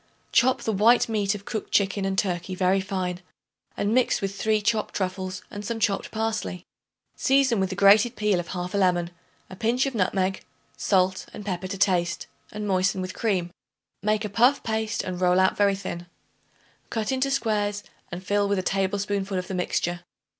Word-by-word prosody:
Chop 255 Hz, +2 st, +3 dB
the 220 Hz, -, 0 dB
white 225 Hz, +5 st, +4 dB
meat 210 Hz, -3 st, 0 dB
of 200 Hz, -1 st, -9 dB
cooked 215 Hz, -, -5 dB
chicken 200 Hz, 0 st, +2 dB
and 190 Hz, 0 st, -1 dB
turkey 185 Hz, -1 st, -1 dB
very 185 Hz, +1 st, +2 dB
fine 185 Hz, -2 st, -3 dB, 0.6 s
and 205 Hz, +2 st, 0 dB
mix 255 Hz, 0 st, +3 dB
with 195 Hz, 0 st, -3 dB
3 215 Hz, +1 st, +1 dB
chopped 215 Hz, +1 st, -1 dB
truffles 185 Hz, -1 st, -3 dB
and 205 Hz, 0 st, -6 dB
some 225 Hz, +2 st, -3 dB
chopped 200 Hz, -2 st, 0 dB
parsley. 220 Hz, -5 st, -3 dB, 0.5 s
Season 265 Hz, -4 st, +3 dB
with 190 Hz, -1 st, 0 dB
the 190 Hz, -, -4 dB
grated 205 Hz, +5 st, +5 dB
peel 210 Hz, -4 st, +1 dB
of 175 Hz, -, -5 dB
1/2 180 Hz, 0 st, -4 dB
lemon, 175 Hz, -2 st, +2 dB, 0.4 s
a 185 Hz, -, -10 dB
pinch 235 Hz, +6 st, +1 dB
of 270 Hz, -, -2 dB
nutmeg, 190 Hz, -2 st, 0 dB, 0.3 s
salt 185 Hz, -1 st, +1 dB
and 210 Hz, -, -8 dB
pepper 185 Hz, -2 st, -3 dB
to 195 Hz, -, -5 dB
taste, 180 Hz, -3 st, +1 dB, 0.3 s
and 210 Hz, 0 st, -5 dB
moisten 190 Hz, 0 st, +1 dB
with 185 Hz, 0 st, -4 dB
cream. 185 Hz, -6 st, -1 dB, 0.5 s
Make 215 Hz, +2 st, 0 dB
a -, -, -3 dB
puff 245 Hz, +7 st, +3 dB
paste 220 Hz, -1 st, -1 dB
and 185 Hz, -1 st, -5 dB
roll 180 Hz, 0 st, +4 dB
out 190 Hz, 0 st, +3 dB
very 200 Hz, -1 st, +3 dB
thin. 175 Hz, -3 st, -6 dB, 0.8 s
Cut 220 Hz, 0 st, -2 dB
into 265 Hz, +1 st, +1 dB
squares 210 Hz, -6 st, 0 dB, 0.3 s
and 180 Hz, +1 st, -7 dB
fill 205 Hz, +1 st, +1 dB
with 200 Hz, -, +1 dB
a 185 Hz, -, -1 dB
tablespoonful 195 Hz, 0 st, -1 dB
of 185 Hz, -, -3 dB
the -, -, -5 dB
mixture. 175 Hz, -1 st, -1 dB
195 Hz, 180 wpm, -25 LUFS, 185-215 Hz, 0.8 s, grated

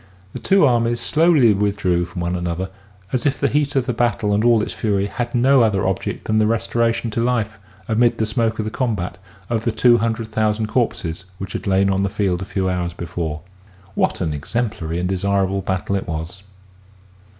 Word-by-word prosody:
The -, -, -5 dB
two 195 Hz, -4 st, +4 dB
armies 120 Hz, -2 st, +2 dB
slowly 155 Hz, -8 st, +4 dB
withdrew 100 Hz, -3 st, 0 dB
from 90 Hz, 0 st, -7 dB
one 85 Hz, +1 st, -1 dB
another, 90 Hz, +2 st, -3 dB, 0.4 s
as 130 Hz, +1 st, +1 dB
if 140 Hz, -, 0 dB
the 140 Hz, -, +2 dB
heat 145 Hz, 0 st, 0 dB
of 135 Hz, -2 st, +2 dB
the 125 Hz, -, -1 dB
battle 110 Hz, -3 st, +1 dB
and 105 Hz, +2 st, +2 dB
all 115 Hz, -2 st, +4 dB
its -, -, -4 dB
fury 100 Hz, -3 st, 0 dB
had 120 Hz, +4 st, -4 dB
no 130 Hz, +2 st, +5 dB
other 105 Hz, -4 st, +2 dB
object 95 Hz, -1 st, -2 dB
than 110 Hz, 0 st, +1 dB
the 105 Hz, -, +3 dB
restoration 115 Hz, +1 st, 0 dB
to 115 Hz, -, -1 dB
life, 115 Hz, -4 st, -1 dB, 0.3 s
amid 115 Hz, +1 st, +2 dB
the 110 Hz, -, +1 dB
smoke 110 Hz, 0 st, 0 dB
of 110 Hz, -, -2 dB
the 110 Hz, -, -3 dB
combat, 100 Hz, -9 st, -2 dB, 0.3 s
of 115 Hz, -1 st, -1 dB
the 115 Hz, -, +1 dB
two 120 Hz, +1 st, +4 dB
hundred 115 Hz, 0 st, -2 dB
thousand 110 Hz, 0 st, 0 dB
corpses 95 Hz, -7 st, -2 dB
which 95 Hz, 0 st, -6 dB
had -, -, -4 dB
lain 95 Hz, 0 st, +3 dB
on 95 Hz, 0 st, +1 dB
the 100 Hz, -, +1 dB
field 95 Hz, -3 st, -1 dB
a -, -, -4 dB
few 95 Hz, -1 st, -2 dB
hours 90 Hz, -2 st, -1 dB
before. 85 Hz, -3 st, -4 dB, 0.5 s
What -, -, 0 dB
an 80 Hz, -4 st, -1 dB
exemplary 85 Hz, -, -3 dB
and 90 Hz, +1 st, -1 dB
desirable 95 Hz, +1 st, 0 dB
battle 95 Hz, +1 st, -2 dB
it 95 Hz, -, -3 dB
was 80 Hz, +3 st, -5 dB
105 Hz, 200 wpm, -20 LUFS, 95-115 Hz, 0.5 s, no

